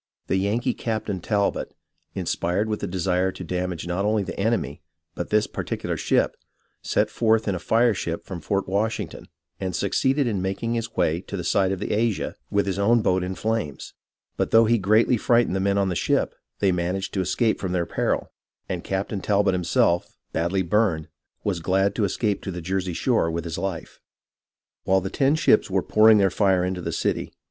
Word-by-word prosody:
The 95 - 0
Yankee 115 +6 0
Captain 110 -4 -3
Talbot, 100 +1 -1 0.4
inspired 90 +5 -1
with 105 -1 -2
a 100 - -2
desire 95 0 0
to - - -8
damage 90 -1 -3
not 90 +3 -1
only 105 0 +1
the 95 - -6
enemy, 100 -9 -1 0.3
but 85 - -5
this 105 0 +3
particular - - -4
ship, - - +1 0.5
set - - +1
forth 110 -1 +2
in 100 - +1
a 90 - -3
fire 115 +6 +3
ship 85 -3 -4
from 90 -4 -6
Fort 100 +6 -1
Washington, 105 +4 -2 0.3
and 95 -2 -3
succeeded 135 +7 +1
in 105 -6 -1
making 100 +5 -2
his 115 0 -3
way 85 -1 +1
to 100 - -6
the 90 - -4
side 95 +2 +2
of 95 - -1
the - - -3
Asia 110 -1 0 0.2
with 100 -1 +1
his 95 0 -2
own 115 +3 +3
boat 90 0 +2
in 95 +1 -3
flames; 110 -11 -3 0.4
but - - 0
though 115 0 +6
he 115 +1 +3
greatly 110 +5 +3
frightened 115 -3 +2
the - - 0
men 100 +1 +1
on 100 -1 +2
the 90 - -2
ship, - - +1 0.2
they 100 - +2
managed 90 +2 -2
to 95 - 0
escape 110 +5 +1
from 95 - -3
their 90 -2 0
peril, - - -1 0.4
and 90 -2 -4
Captain 95 +1 -2
Talbot 100 -1 +2
himself, 85 -1 +1 0.2
badly 85 +3 0
burned, 85 -4 +1 0.3
was 95 -4 -1
glad 95 +4 +1
to 105 - +1
escape 100 +1 -1
to - - -6
the 90 -2 -4
Jersey 90 +1 -2
shore 115 -2 +1
with 85 0 -3
his 85 0 -4
life. 95 -3 -5 0.8
While 95 0 +3
the 95 +1 -4
ten 140 +5 +2
ships 155 -10 +3
were 95 -1 +1
pouring 110 0 +6
their 95 -2 +3
fire 95 -3 +2
into 90 -1 -3
the - - -3
city. - - -1
95 Hz, 195 wpm, -24 LUFS, 90-110 Hz, 0.8 s, though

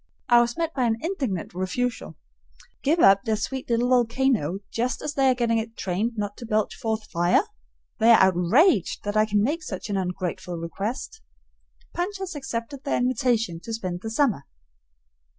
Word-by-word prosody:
I 240 -1 +7
was 240 +3 -1
met 330 -1 -1
by 255 -3 0
an 225 -1 +1
indignant 270 - -3
refusal. 185 +1 -3 0.7
Give 320 +4 +2
up 195 0 +6
their 220 - 0
sweet 255 +5 -4
little 235 +1 +2
volcano 235 - +1
just 240 +1 -1
as 300 - -3
they 270 -1 +3
are 255 - +3
getting 230 -2 +1
it 225 0 -6
trained 200 +6 -1
not 205 -1 -3
to 240 - -8
belch 215 -1 0
forth 220 -1 -3
fire? 175 +1 +3 0.6
They 225 - +5
are 230 - +8
outraged 200 - +3
that 205 0 -3
I 215 0 +4
can 205 -1 +2
make 305 +8 0
such 205 -6 -6
an 200 - 0
ungrateful 180 -1 -3
request. 210 - -5 0.7
Punch 375 +4 -2
has 380 -1 -5
accepted 265 -2 -5
their - - 0
invitation 240 -7 0
to 225 +6 -7
spend 185 -5 -4
the 220 - -5
summer. 225 - +1
230 Hz, 175 wpm, -25 LUFS, 195-260 Hz, 0.7 s, are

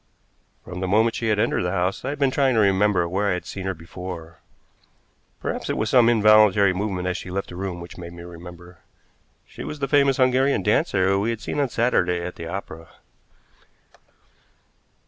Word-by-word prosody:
From 90 0 -7
the 95 - -2
moment 110 +4 +3
she 115 - -3
had 105 -1 +2
entered 110 +3 +1
the 90 - -1
house 90 +1 -1
I - - -3
had 145 - -4
been 140 -2 +2
trying 135 -2 +2
to - - +3
remember 100 -3 +3
where 100 +4 0
I - - +2
had 90 -2 -4
seen 95 -1 -6
her 95 - -2
before. 85 0 -9 1.0
Perhaps - - -4
it - - -1
was 110 - -1
some 120 -2 +6
involuntary 105 -3 +5
movement 95 -2 -3
as 90 - -1
she - - -8
left 95 +2 -4
the 90 - -9
room 90 -1 -4
which 85 +1 -10
made 85 -1 -8
me 85 0 -10
remember. 90 0 -12 0.7
She - - -10
was 150 - -6
the 140 -1 -2
famous 140 -2 +3
Hungarian 130 -4 +2
dancer 95 -1 +2
we 105 +3 0
had 115 -2 -2
seen 145 - -4
on 140 -2 +1
Saturday 90 -8 +1
at 90 +1 -6
the 85 - -7
opera. 85 -3 -7
95 Hz, 195 wpm, -23 LUFS, 90-115 Hz, 1.0 s, some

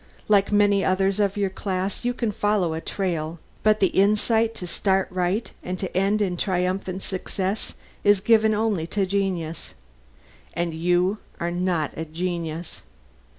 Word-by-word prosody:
Like 200 -1 +4
many 205 -1 +4
others 195 +1 +1
of 200 -1 +1
your 200 -2 0
class 190 +1 -3
you 245 0 0
can 235 -3 -1
follow 205 -5 +1
a 160 - -3
trail, 170 -4 -2 0.2
but 215 0 +3
the 190 - +4
insight 220 +3 +2
to 180 - -5
start 190 +2 +1
right 185 +4 -1
and 180 +1 -4
to 185 -1 -5
end 200 +3 +2
in 180 -3 -1
triumphant 185 0 -1
success 190 +2 -3 0.3
is 205 -1 +5
given 220 +1 +4
only 210 -7 0
to 205 - -2
a - - +2
genius, 185 -4 -2 0.8
and 170 0 -1
you 180 +5 +1 0.2
are 170 0 -1
not 175 -4 0
a 160 - -4
genius." 170 0 -4
190 Hz, 155 wpm, -24 LUFS, 175-205 Hz, 0.8 s, is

